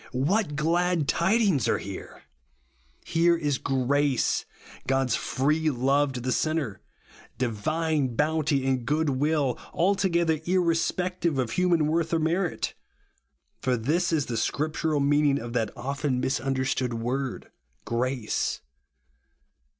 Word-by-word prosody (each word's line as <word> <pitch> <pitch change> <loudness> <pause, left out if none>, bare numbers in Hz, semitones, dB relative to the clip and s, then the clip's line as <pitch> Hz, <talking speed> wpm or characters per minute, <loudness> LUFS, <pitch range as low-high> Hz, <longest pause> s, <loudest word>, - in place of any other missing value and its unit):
What 165 +4 +1
glad 170 +1 +1
tidings 190 - +2
are - - +2
here! 100 -1 -8 0.8
Here 170 +1 +3
is 145 -4 -1
GRACE; 135 0 +1 0.4
God's 135 -3 +2
free 155 +4 0
love 135 +2 +2
to 125 - -4
the 130 +1 -2
sinner; 155 -9 -1 0.6
divine 135 +3 -1
bounty 150 -1 +1
and 130 -2 +1
goodwill, 145 -1 +1
altogether 170 -3 +1
ir 185 +3 +2
respective 170 -1 0
of 125 -4 -1
human 175 -2 +2
worth 165 +2 0
or - - +2
merit. 170 +3 -1 0.9
For 130 -1 +1
this 165 +10 0
is 155 -4 +1
the 115 - -3
scriptural 155 +3 0
meaning 145 0 +3
of 115 0 -7
that 115 -3 0
often 135 +1 -2
misunderstood 130 -1 -1
word 125 +3 -3 0.3
"grace." 120 -1 -1
145 Hz, 115 wpm, -26 LUFS, 130-165 Hz, 0.9 s, Here